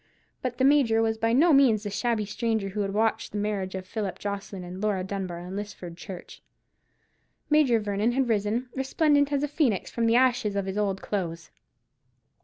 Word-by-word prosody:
But 250 -1 -3
the 260 - +1
Major 270 -6 +4
was 220 0 0
by 225 0 +1
no 305 +7 +5
means 245 -7 +5
the 205 - -4
shabby 225 0 0
stranger 220 -1 -1
who 205 +2 -5
had 200 -1 -1
watched 220 +2 0
the - - -2
marriage 205 -2 -2
of 185 0 -5
Philip 200 -1 -4
Jocelyn 200 -2 -5
and 180 +2 -8
Laura 205 -3 0
Dunbar 190 -2 -4
in 180 +2 -7
Lisford 200 -4 -7
Church. 180 0 -10 1.1
Major 285 -7 +4
Vernon 210 +2 0
had 265 0 +1
risen, 225 +3 0
resplendent 285 +2 +2
as 280 -1 +1
the 295 - 0
phoenix, 275 - 0
from 230 -1 0
the 230 - +3
ashes 245 -4 +2
of 200 -1 -1
his 190 0 -4
old 200 -2 -1
clothes. 170 -5 -4
215 Hz, 190 wpm, -27 LUFS, 195-245 Hz, 1.1 s, no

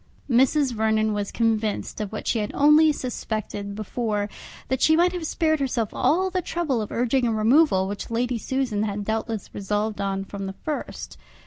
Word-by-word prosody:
Mrs. 270 +2 +3
Vernon 220 -1 +1
was 205 -1 -2
then - - -12
convinced 220 -2 0
of 210 - -4
what 215 - -6
she 230 - +1
had 210 0 -2
only 300 +2 +6
suspected 215 -6 -4
before, 215 -1 -2 0.4
that 260 0 -1
she 315 - +5
might 350 +2 +4
have 350 -3 -4
spared 315 -1 +1
herself 245 -5 -1
all 375 +4 +2
the 370 0 0
trouble 310 -9 -1
of 210 - -5
urging 245 +1 +1
a - - +1
removal 220 -2 +4
which 200 0 -5
Lady 240 +1 -1
Susan 255 -4 -1
had 205 -1 -2
doubtless 220 -1 -3
resolved 210 +1 -2
on 195 0 -2
from 195 -1 -6
the 190 - -6
first. 305 -2 -5
225 Hz, 185 wpm, -24 LUFS, 210-275 Hz, 0.4 s, only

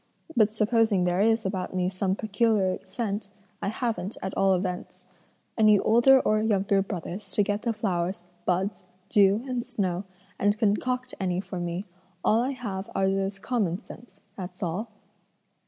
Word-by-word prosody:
But 215 -3 +5
supposing 220 -2 +2
there 180 +1 +1
is 225 0 +3
about 190 -1 -3
me 180 -1 +1
some 190 0 0
peculiar 210 -3 +1
scent, 200 +1 -3 0.3
I - - -2
haven't, 220 -2 -2
at 190 - -3
all 195 -1 +4
events, 180 0 -4 0.5
any 215 -1 +7
older 240 +6 +6
or 215 0 +2
younger 200 -2 +2
brothers 190 +1 -5
to 205 - +3
get 205 +1 -1
the 235 - 0
flowers, 185 -4 -2 0.2
buds, 185 +3 -1 0.3
dew, 205 +2 +4
and 250 -2 -1
snow, 200 -7 -2 0.3
and 205 +1 +2
concoct 250 +4 0
any 180 -2 0
for 185 -1 -5
me; 175 +3 -3 0.4
all 225 +2 +4
I 255 - 0
have 200 -7 -5
are 190 - +2
those 195 0 -1
common 195 -4 -1
scents, 210 -4 -13
that's 185 0 -7
all." 185 +7 -2
200 Hz, 155 wpm, -27 LUFS, 185-220 Hz, 0.5 s, any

